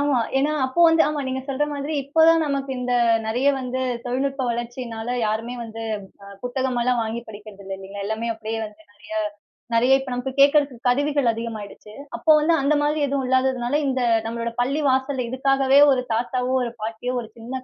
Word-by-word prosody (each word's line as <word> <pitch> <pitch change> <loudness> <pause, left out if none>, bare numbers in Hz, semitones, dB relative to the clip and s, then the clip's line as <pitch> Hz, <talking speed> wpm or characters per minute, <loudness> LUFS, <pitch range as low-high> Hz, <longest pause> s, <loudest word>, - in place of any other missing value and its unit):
ஆமா. 285 -3 +2 0.2
ஏன்னா, 285 +3 +1
அப்போ 260 +6 -1
வந்து 325 0 +5
ஆமா 300 -1 -2
நீங்க 260 0 -2
சொல்ற 275 +1 0
மாதிரி 285 +2 -4
இப்ப 310 +4 +3
தான் 330 -1 +5
நமக்கு 275 -1 -2
இந்த 250 0 -2 0.3
நிறைய 245 +6 +1
வந்து 255 0 -3 0.2
தொழில்நுட்ப 265 +2 -1
வளர்ச்சியினால 235 -1 -5 0.2
யாருமே 225 +3 -2
வந்து, 225 0 -8 0.4
அ - - -12 0.2
புத்தகம் 255 0 -1
எல்லாம் 250 0 +1
வாங்கி 225 +1 -3
படிக்கிறது 205 -1 -11
இல்ல 195 - -7
இல்லீங்களா? 195 +1 -7
எல்லாமே 220 +2 -2
அப்பிடியே 225 0 -4
வந்து 210 0 -16
நெறைய 205 +1 -11 0.6
நெறைய 250 +3 +4
இப்ப 265 -1 -7
நமக்கு 250 +2 -3
கேக்குறதுக்கு 280 -3 +3
கருவிகள் 285 -1 +2
அதிகமாயிடுச்சு. 220 -2 -7 0.2
அப்போ 320 - +3
வந்து 310 +3 +2
அந்த 285 +2 +2
மாதிரி 300 +1 +1
எதுவும் 275 -1 -1
இல்லாததுனால, 260 0 +1
இந்த 260 -1 0 0.3
நம்மளோட 230 0 -3
பள்ளி 275 +5 0
வாசல்ல 265 -1 0
இதுக்காகவே 270 +1 +3
ஒரு 255 -2 +1
தாத்தாவோ, 250 +2 -1
ஒரு 235 -1 -4
பாட்டியோ, 225 +3 -3
ஒரு 225 - -10
சின்ன 255 +3 -6
250 Hz, 175 wpm, -23 LUFS, 230-275 Hz, 0.6 s, வந்து